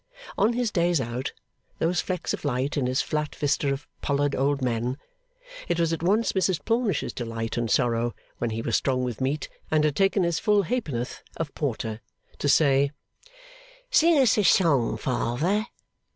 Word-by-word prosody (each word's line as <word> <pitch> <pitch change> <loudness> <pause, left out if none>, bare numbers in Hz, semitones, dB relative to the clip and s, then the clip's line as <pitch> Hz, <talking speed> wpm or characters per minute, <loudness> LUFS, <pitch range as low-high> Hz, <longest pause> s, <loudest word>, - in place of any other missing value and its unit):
On 215 +4 +3
his 240 -2 0
'days 175 -3 +2
out,' 120 +1 -3 0.5
those 170 +2 +1
flecks 180 -3 -3
of - - -5
light 140 0 -1
in 135 -4 0
his 130 +2 +1
flat 150 -1 -2
vista 145 -1 +1
of 140 +1 -4
pollard 145 0 0
old 140 +1 +1
men,' 125 0 -1 0.7
it 175 - 0
was 165 -1 +2
at 165 - -3
once 205 +7 +2
Mrs 185 -3 +1
Plornish's 230 -3 0
delight 115 -2 -4
and 120 -1 -1
sorrow, 120 -1 +1 0.2
when 120 - -1
he 115 +1 -3
was 115 - 0
strong 130 -2 +1
with 125 -2 -4
meat, 140 +3 -1 0.2
and 155 -1 +3
had 150 -2 +1
taken 195 0 +3
his 170 -2 0
full 210 -1 +3
halfpenny 190 - -2
worth 120 +1 -5 0.2
of 160 -3 -4
porter, 115 -6 -3 0.4
to 145 - 0
say, 140 -2 +4 1.0
'Sing 335 -8 +5
us 250 -6 +4
a - - +3
song, 145 - +3
Father. 140 - 0
145 Hz, 175 wpm, -26 LUFS, 125-180 Hz, 1.0 s, Sing